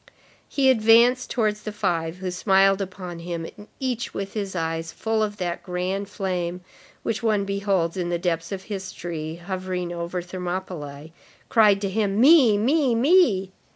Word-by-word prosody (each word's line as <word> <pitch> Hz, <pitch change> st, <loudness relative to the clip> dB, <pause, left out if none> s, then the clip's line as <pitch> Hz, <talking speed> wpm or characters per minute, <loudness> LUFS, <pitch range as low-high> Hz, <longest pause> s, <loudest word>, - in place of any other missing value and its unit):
He 270 Hz, -2 st, +4 dB
advanced 235 Hz, +2 st, +4 dB
towards 215 Hz, -3 st, 0 dB
the 215 Hz, -, -5 dB
five, 175 Hz, -5 st, -1 dB
who 185 Hz, 0 st, -4 dB
smiled 195 Hz, +1 st, +3 dB
upon 185 Hz, -2 st, -6 dB
him, 170 Hz, -1 st, -5 dB
and 210 Hz, 0 st, -13 dB
each, 255 Hz, -3 st, -3 dB
with 195 Hz, 0 st, -4 dB
his 200 Hz, -3 st, -4 dB
eyes 165 Hz, -1 st, -2 dB
full 220 Hz, +4 st, -1 dB
of 210 Hz, -1 st, -1 dB
that 175 Hz, -2 st, -3 dB
grand 185 Hz, +2 st, -3 dB
flame 180 Hz, -3 st, -3 dB, 0.4 s
which 230 Hz, -, -2 dB
one 215 Hz, -3 st, +1 dB
beholds 195 Hz, -3 st, 0 dB
in 175 Hz, -1 st, -2 dB
the 175 Hz, -, 0 dB
depths 170 Hz, -1 st, -2 dB
of 190 Hz, -1 st, -4 dB
history 175 Hz, -5 st, -5 dB
hovering 180 Hz, 0 st, -4 dB
over 170 Hz, +1 st, -3 dB
Thermopylæ, 175 Hz, -5 st, -6 dB, 0.4 s
cried 210 Hz, -5 st, +5 dB
to 200 Hz, -, -1 dB
him: 205 Hz, 0 st, 0 dB
"Me! 260 Hz, -5 st, +7 dB
me! 260 Hz, +3 st, +2 dB
me!" 235 Hz, -, +4 dB
195 Hz, 155 wpm, -24 LUFS, 175-215 Hz, 0.4 s, Me